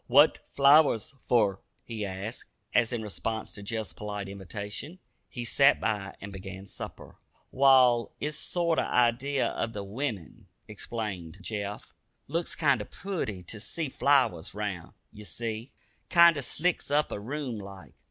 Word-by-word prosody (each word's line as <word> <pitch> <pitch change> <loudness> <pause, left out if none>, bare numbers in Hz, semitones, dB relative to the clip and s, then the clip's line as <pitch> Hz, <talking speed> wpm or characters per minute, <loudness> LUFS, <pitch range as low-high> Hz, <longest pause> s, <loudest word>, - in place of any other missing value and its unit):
"What 145 +5 +6 0.2
flowers 140 -4 +5 0.2
fer?" 105 -5 +3 0.2
he 110 -3 -5
asked, 95 +5 -6 0.2
as, 120 -2 +3
in 120 -2 -2
response 110 +1 -3
to 100 - -9
Jeff's 110 0 -4
polite 105 -1 -5
invitation, 100 - -6 0.3
he 120 -1 -5
"sat 140 +4 +5
by" 100 -3 -2
and 100 0 -8
began 95 0 -8
supper. - - -9 0.3
"Wall, 130 -3 +5
it's 150 0 -3
a - - -6
sorter 170 -2 +1
idee 125 +4 +2
of 115 -1 -1
the 100 - -4
wimmin," 105 - -5 0.2
explained 105 -5 -5
Jeff. 105 0 -5 0.3
"Looks 165 +4 -2
kinder 135 -9 +2
pooty 160 - -4
to 105 +5 -7
see 155 +7 -3
flowers 135 - +2
round; 100 -5 -4 0.2
ye 105 - -11
see, 115 +3 -5 0.4
kinder 170 -4 +7
slicks 170 +7 -1
up 150 +1 +2
a - - -3
room 125 0 -4
like. 95 -7 -11
115 Hz, 145 wpm, -29 LUFS, 100-140 Hz, 0.4 s, kinder